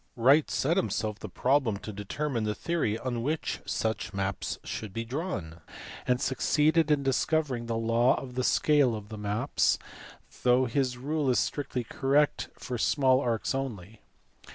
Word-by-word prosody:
Wright 135 +6 +4
set 165 +6 +1
himself 110 - -1
the 105 - -7
problem 125 0 +1
to 105 +1 -8
determine 115 +5 -3
the 105 0 -1
theory 160 -11 -1
on 120 -1 -3
which 150 +6 -2
such 110 -2 -2
maps 95 0 -2
should 105 -3 -6
be 115 +2 -3
drawn, 110 - -4 0.5
and 125 0 +2
succeeded 155 +4 +2
in 145 -2 +2
discovering 135 -2 0
the 115 -1 -1
law 115 +2 +3
of 125 -2 -8
the 130 +1 -1
scale 140 -4 +3
of 105 -1 -8
the 110 - -7
maps, 105 +2 +1 0.6
though 125 +1 +4
his 125 0 0
rule 145 +2 -1
is 125 - +3
strictly 125 +5 -1
correct 145 +4 +1
for 125 -2 -5
small 130 -1 +3
arcs 120 -2 -1
only. 115 -6 -5
125 Hz, 155 wpm, -29 LUFS, 110-140 Hz, 0.6 s, Wright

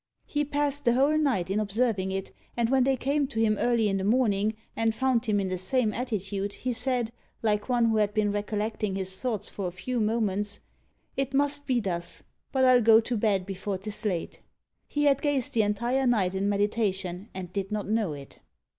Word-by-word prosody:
He 295 0 -1
passed 290 0 -1
the 235 - +4
whole 280 +4 +3
night 255 - +1
in 205 - +1
observing 210 -2 0
it, 195 0 -4 0.3
and 235 0 +1
when 265 -2 +4
they 270 -1 +2
came 280 +2 0
to 260 -5 -4
him 220 -1 +3
early 235 -3 +2
in 195 -1 +1
the 190 - -2
morning, 215 -1 +2 0.2
and 225 -1 +1
found 255 -1 +1
him 205 -1 +2
in 190 -1 -1
the 185 -1 -2
same 220 +3 +1
attitude, 205 -4 -3
he 250 -1 -3
said, 245 -1 0 0.3
like 210 +1 0
one 240 -2 +3
who 225 -1 +2
had 210 -1 +2
been 210 -1 +1
recollecting 210 0 -2
his 190 -1 -1
thoughts 235 -6 -2
for 195 -3 -4
a - - -4
few 235 +8 -3
moments, 210 -2 0 0.6
"It 270 0 -2
must 285 0 +2
be 255 -3 +2
thus; 175 -5 -3 0.3
but 260 -1 +3
I'll 255 -1 +6
go 225 0 +7
to 235 +2 -2
bed 205 -4 +1
before 195 0 -4
'tis 210 +3 -4
late!" 185 -6 -3 0.5
He 295 - -1
had 280 -1 +3
gazed 285 -4 0
the 225 - +3
entire 240 +6 +1
night 200 -7 +2
in 195 +1 0
meditation, 200 -2 -1
and 180 -1 -6
did 195 0 -3
not 210 -2 -2
know 215 -6 0
it. 140 -1 -11
220 Hz, 205 wpm, -27 LUFS, 200-250 Hz, 0.6 s, go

